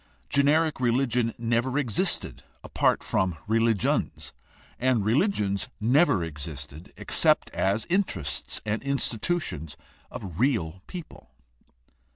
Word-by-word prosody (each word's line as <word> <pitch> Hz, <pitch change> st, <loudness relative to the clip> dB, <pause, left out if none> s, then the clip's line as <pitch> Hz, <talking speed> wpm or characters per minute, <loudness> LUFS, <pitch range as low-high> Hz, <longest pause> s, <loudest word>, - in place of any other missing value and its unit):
Generic 150 Hz, +2 st, +3 dB
religion 120 Hz, -1 st, +1 dB
never 120 Hz, +3 st, 0 dB
existed 120 Hz, -8 st, 0 dB, 0.2 s
apart -, -, +1 dB
from 90 Hz, -4 st, 0 dB
religions, 115 Hz, -2 st, 0 dB, 0.5 s
and 125 Hz, -5 st, +2 dB
religions 110 Hz, -, +1 dB
never 120 Hz, -, +3 dB
existed 75 Hz, 0 st, -8 dB
except -, -, +2 dB
as 100 Hz, +3 st, 0 dB
interests 170 Hz, -, -2 dB
and 105 Hz, +1 st, -1 dB
institutions 130 Hz, -, -1 dB, 0.3 s
of 90 Hz, -3 st, -8 dB
real 95 Hz, -, 0 dB
people. 175 Hz, -4 st, -9 dB
115 Hz, 95 wpm, -26 LUFS, 95-140 Hz, 0.5 s, Generic